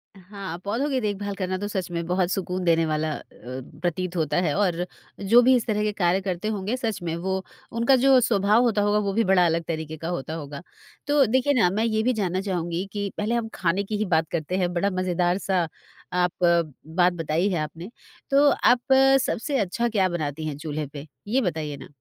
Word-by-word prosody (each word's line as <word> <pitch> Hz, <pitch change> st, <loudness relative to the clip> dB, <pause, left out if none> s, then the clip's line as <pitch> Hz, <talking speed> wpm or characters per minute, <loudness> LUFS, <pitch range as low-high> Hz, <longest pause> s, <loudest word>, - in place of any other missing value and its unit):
हाँ, 190 Hz, -2 st, -8 dB
पौधों 235 Hz, +9 st, -1 dB
की 265 Hz, -2 st, +1 dB
देखभाल 205 Hz, -1 st, -3 dB
करना 185 Hz, -1 st, -2 dB
तो 205 Hz, +2 st, -4 dB
सच 190 Hz, -4 st, -3 dB
में 170 Hz, -1 st, -3 dB
बहुत 180 Hz, 0 st, +1 dB
सुकून 185 Hz, -1 st, -2 dB
देने 165 Hz, -2 st, +3 dB
वाला 155 Hz, 0 st, -1 dB
अ, -, -, -6 dB, 0.2 s
प्रतीत 170 Hz, +8 st, -4 dB
होता 160 Hz, -2 st, 0 dB
है 155 Hz, -5 st, 0 dB
और 180 Hz, -3 st, +1 dB, 0.3 s
जो 220 Hz, +5 st, +5 dB
भी 260 Hz, +1 st, +6 dB
इस 235 Hz, -, 0 dB
तरह 210 Hz, -1 st, 0 dB
के 210 Hz, -, +1 dB
कार्य 180 Hz, -1 st, +1 dB
करते 185 Hz, +1 st, -3 dB
होंगे 215 Hz, +2 st, -2 dB
सच 220 Hz, -6 st, -3 dB
में, 165 Hz, -1 st, -2 dB
वो 190 Hz, +2 st, -2 dB, 0.3 s
उनका 235 Hz, +3 st, +3 dB
जो 265 Hz, +1 st, +5 dB
स्वभाव 210 Hz, 0 st, +3 dB
होता 215 Hz, -4 st, +2 dB
होगा 205 Hz, +1 st, +2 dB
वो 200 Hz, -1 st, -1 dB
भी 230 Hz, +3 st, +2 dB
बड़ा 185 Hz, -2 st, +4 dB
अलग 165 Hz, 0 st, +1 dB
तरीके 160 Hz, -1 st, -4 dB
का 165 Hz, -, -6 dB
होता 160 Hz, -3 st, -4 dB
होगा। 145 Hz, -2 st, -6 dB, 0.5 s
तो 290 Hz, -1 st, +4 dB
देखिए 260 Hz, +5 st, +2 dB
ना 225 Hz, -9 st, +4 dB
मैं 210 Hz, +4 st, 0 dB
ये 220 Hz, -1 st, +1 dB
भी 255 Hz, +2 st, +2 dB
जानना 190 Hz, -4 st, -1 dB
चाहूँगी 175 Hz, -2 st, -2 dB
कि 205 Hz, -1 st, -2 dB
पहले 215 Hz, +3 st, 0 dB
हम 230 Hz, -1 st, -1 dB
खाने 185 Hz, +3 st, 0 dB
की 210 Hz, +1 st, -3 dB
ही 215 Hz, -, 0 dB
बात 160 Hz, 0 st, +1 dB
करते 170 Hz, +2 st, -2 dB
हैं 180 Hz, -2 st, 0 dB
बड़ा 190 Hz, +3 st, +1 dB
मज़ेदार 180 Hz, -1 st, 0 dB
सा 185 Hz, -4 st, 0 dB, 0.5 s
आप 180 Hz, -1 st, +2 dB
बात 170 Hz, +1 st, +2 dB
बताई 165 Hz, +3 st, 0 dB
है 175 Hz, -, -1 dB
आपने, 160 Hz, +4 st, -6 dB, 0.4 s
तो 285 Hz, +1 st, +5 dB
आप 250 Hz, +1 st, +3 dB, 0.3 s
सबसे 275 Hz, +4 st, -1 dB
अच्छा 215 Hz, +5 st, 0 dB
क्या 195 Hz, -4 st, +2 dB
बनाती 155 Hz, -3 st, -3 dB
हैं 145 Hz, -2 st, -4 dB
चूल्हे 150 Hz, -1 st, -4 dB
पे, 145 Hz, +1 st, -9 dB, 0.2 s
ये 255 Hz, +6 st, +2 dB
बताइए 155 Hz, -6 st, -3 dB
ना? 135 Hz, -, -11 dB
185 Hz, 215 wpm, -25 LUFS, 170-210 Hz, 0.5 s, भी